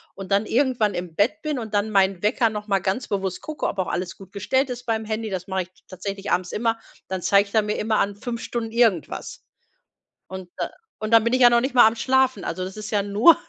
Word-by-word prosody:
und 195 Hz, 0 st, -9 dB
dann 200 Hz, +2 st, +2 dB
irgendwann 245 Hz, -6 st, +1 dB
im 175 Hz, -2 st, -5 dB
Bett 245 Hz, -, +1 dB
bin 300 Hz, -4 st, -2 dB
und 220 Hz, -2 st, -5 dB
dann 210 Hz, +1 st, +1 dB
mein 195 Hz, -2 st, +2 dB
Wecker 230 Hz, +1 st, +3 dB
noch 210 Hz, -1 st, -5 dB
mal 195 Hz, -1 st, +2 dB
ganz 190 Hz, +7 st, -2 dB
bewusst 190 Hz, -3 st, -2 dB
gucke, 310 Hz, -1 st, -3 dB
ob 200 Hz, -, -4 dB
auch 185 Hz, -, 0 dB
alles 180 Hz, +1 st, -3 dB
gut 195 Hz, -1 st, -14 dB
gestellt 260 Hz, +6 st, 0 dB
ist 245 Hz, +1 st, -7 dB
beim 220 Hz, -1 st, -1 dB
Handy. 220 Hz, 0 st, -3 dB
Das 185 Hz, -2 st, -4 dB
mache 190 Hz, -1 st, -1 dB
ich 175 Hz, -, -18 dB, 0.2 s
tatsächlich 195 Hz, +1 st, -5 dB
abends 180 Hz, -1 st, 0 dB
immer. 225 Hz, 0 st, 0 dB, 0.3 s
Dann 185 Hz, -1 st, -3 dB
zeigt 200 Hz, +2 st, +3 dB
er 220 Hz, -, +5 dB
mir 210 Hz, 0 st, -2 dB
immer 215 Hz, 0 st, +1 dB
an, 200 Hz, 0 st, 0 dB
5 235 Hz, +2 st, -5 dB
Stunden 225 Hz, -2 st, -4 dB
irgendwas. 225 Hz, -8 st, 0 dB, 0.8 s
Und 185 Hz, -1 st, -8 dB
da -, -, -2 dB, 0.3 s
und 215 Hz, -, -1 dB
dann 225 Hz, -1 st, +7 dB
bin 235 Hz, +2 st, 0 dB
ich 255 Hz, -, +2 dB
ja 240 Hz, -, +9 dB
noch 235 Hz, 0 st, +4 dB
nicht 265 Hz, +1 st, -2 dB
mal 240 Hz, -3 st, +8 dB
am 225 Hz, -, +1 dB
Schlafen. 265 Hz, +2 st, +2 dB
Also 185 Hz, -, -3 dB
das 190 Hz, +3 st, -7 dB
ist 215 Hz, +1 st, -6 dB
ja 205 Hz, -1 st, +2 dB
nur 205 Hz, +11 st, +6 dB
210 Hz, 245 wpm, -23 LUFS, 195-235 Hz, 0.8 s, ja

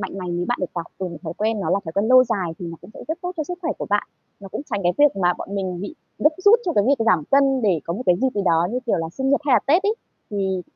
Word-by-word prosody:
mạnh 195 Hz, 0 st, -5 dB
này 180 Hz, -1 st, -4 dB, 0.2 s
bạn 245 Hz, -, 0 dB
được 185 Hz, -, 0 dB
học 170 Hz, -1 st, -4 dB
từ 190 Hz, -, -2 dB
những 170 Hz, -3 st, -8 dB
thói 165 Hz, -2 st, -5 dB
quen 215 Hz, 0 st, 0 dB
nó -, -, -2 dB
là 195 Hz, -, +3 dB
thói 160 Hz, -, -6 dB
quen 205 Hz, +4 st, 0 dB
lâu 255 Hz, 0 st, +7 dB
dài, 190 Hz, -8 st, -2 dB
thì 175 Hz, -, -6 dB
nó 165 Hz, 0 st, -7 dB
cũng -, -, -14 dB
sẽ -, -, -10 dB
rất 325 Hz, +2 st, -2 dB
tốt 360 Hz, 0 st, -3 dB
cho 310 Hz, -, -2 dB
sức 355 Hz, +3 st, -6 dB
khỏe 325 Hz, -, -1 dB
của -, -, -4 dB
bạn. 205 Hz, 0 st, +1 dB, 0.3 s
Nó 195 Hz, -, -9 dB
cũng 280 Hz, -, -5 dB
tránh 205 Hz, -2 st, -1 dB
cái 175 Hz, 0 st, +2 dB
việc 290 Hz, -8 st, +5 dB
mà 175 Hz, 0 st, +3 dB
bọn 200 Hz, -, -6 dB
mình 185 Hz, -2 st, -3 dB
bị 205 Hz, +11 st, -6 dB, 0.2 s
gấp 305 Hz, -, +4 dB
rút 445 Hz, +3 st, +7 dB
cho 345 Hz, -, 0 dB
cái 205 Hz, -8 st, +2 dB
việc 270 Hz, -5 st, +2 dB
giảm 175 Hz, -9 st, +3 dB
cân 270 Hz, -2 st, +3 dB
để 185 Hz, -7 st, +2 dB
có 170 Hz, -, -3 dB
một 245 Hz, -, -4 dB
cái 180 Hz, -1 st, +4 dB
dịp 265 Hz, -, +4 dB
gì 205 Hz, -, 0 dB
đó, 165 Hz, 0 st, +3 dB
như 250 Hz, -, -1 dB
kiểu -, -, +2 dB
là, 165 Hz, 0 st, -3 dB
sinh 265 Hz, +5 st, -1 dB
nhật 280 Hz, -, +3 dB
hay 270 Hz, -, +3 dB
là -, -, +6 dB
Tết 335 Hz, +8 st, +4 dB
ấy. 420 Hz, +2 st, +1 dB, 0.4 s
Thì 190 Hz, -3 st, -1 dB
205 Hz, 330 wpm, -22 LUFS, 180-270 Hz, 0.4 s, lâu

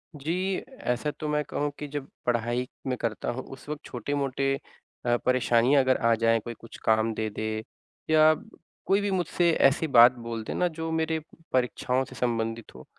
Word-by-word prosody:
जी, 180 Hz, +6 st, -1 dB
ऐसा 150 Hz, -, -3 dB
तो 155 Hz, -, -3 dB
मैं 150 Hz, 0 st, +1 dB
कहूँ 145 Hz, 0 st, -2 dB
कि 150 Hz, -, -4 dB
जब 145 Hz, -1 st, -5 dB, 0.2 s
पढ़ाई 120 Hz, +1 st, 0 dB, 0.2 s
मैं 125 Hz, -1 st, -1 dB
करता 115 Hz, -2 st, -2 dB
हूँ, 130 Hz, +2 st, -5 dB
उस 135 Hz, -, -12 dB
वक़्त 150 Hz, 0 st, -4 dB
छोटे-मोटे 135 Hz, +2 st, -1 dB, 0.5 s
अ, 120 Hz, 0 st, +3 dB
परेशानियाँ 130 Hz, +2 st, +4 dB
अगर 130 Hz, 0 st, +3 dB
आ 115 Hz, 0 st, +3 dB
जाएँ, 115 Hz, 0 st, +3 dB
कोई 120 Hz, +2 st, -7 dB
कुछ 115 Hz, -, -12 dB
काम 110 Hz, 0 st, +3 dB
दे 110 Hz, 0 st, -2 dB
दे 110 Hz, +1 st, -3 dB, 0.5 s
या 155 Hz, 0 st, +6 dB, 0.5 s
कोई 200 Hz, +1 st, +3 dB
भी 200 Hz, -1 st, -1 dB
मुझसे 175 Hz, -1 st, +2 dB
ऐसी 140 Hz, +4 st, +3 dB
बात 120 Hz, -2 st, +8 dB, 0.2 s
बोल 115 Hz, -1 st, -3 dB
दे -, -, -4 dB
ना, 180 Hz, -, +2 dB
जो 160 Hz, 0 st, -4 dB
मेरे 160 Hz, 0 st, 0 dB, 0.3 s
परीक्षाओं 130 Hz, +1 st, +1 dB
से 130 Hz, -, -12 dB
संबंधित 115 Hz, -2 st, -2 dB
हो, 65 Hz, -, -11 dB
130 Hz, 180 wpm, -27 LUFS, 115-150 Hz, 0.5 s, बात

